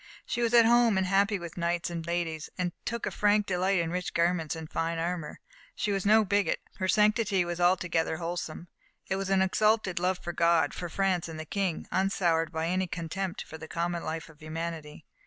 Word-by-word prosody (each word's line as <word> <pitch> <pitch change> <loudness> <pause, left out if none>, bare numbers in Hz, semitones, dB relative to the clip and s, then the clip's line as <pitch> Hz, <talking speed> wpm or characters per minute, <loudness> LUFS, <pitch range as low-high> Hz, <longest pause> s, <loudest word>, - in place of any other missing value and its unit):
She 240 - -2
was 235 -1 +2
at 235 -1 +8
home 235 -3 +5
and 190 - +2
happy 200 +2 +2
with 170 -2 -8
knights 170 0 -1
and 170 -1 -4
ladies, 170 -2 -2
and 180 -1 -1
took 235 0 -2
a - - -2
frank 210 0 +3
delight 190 +1 +1
in 165 -1 0
rich 180 0 -3
garments 170 -2 +1
and 160 -1 -7
fine 165 +1 -2
armour. 165 -1 -3 0.4
She 210 - -1
was 195 0 -1
no 215 +1 +6
bigot, 205 +1 +1 0.2
her 185 - -1
sanctity 210 -1 +3
was 175 0 -4
altogether 175 -3 +2
wholesome: 170 0 -5 0.4
it 190 - -1
was 195 0 -3
an 190 -1 +4
exalted 210 -1 +2
love 180 +1 +1
for 175 - -6
God, 170 -3 +3
for 175 - -5
France 185 -1 0
and 160 -1 -7
the 155 - -5
King, 190 -1 -2
unsoured 175 -4 +1
by 160 -1 -2
any 185 +1 0
contempt 180 +2 -4
for 160 - -10
the 160 - -8
common 170 +1 -2
life 160 0 -4
of 160 -2 -17
humanity. 155 -1 -6
175 Hz, 205 wpm, -29 LUFS, 165-195 Hz, 0.4 s, at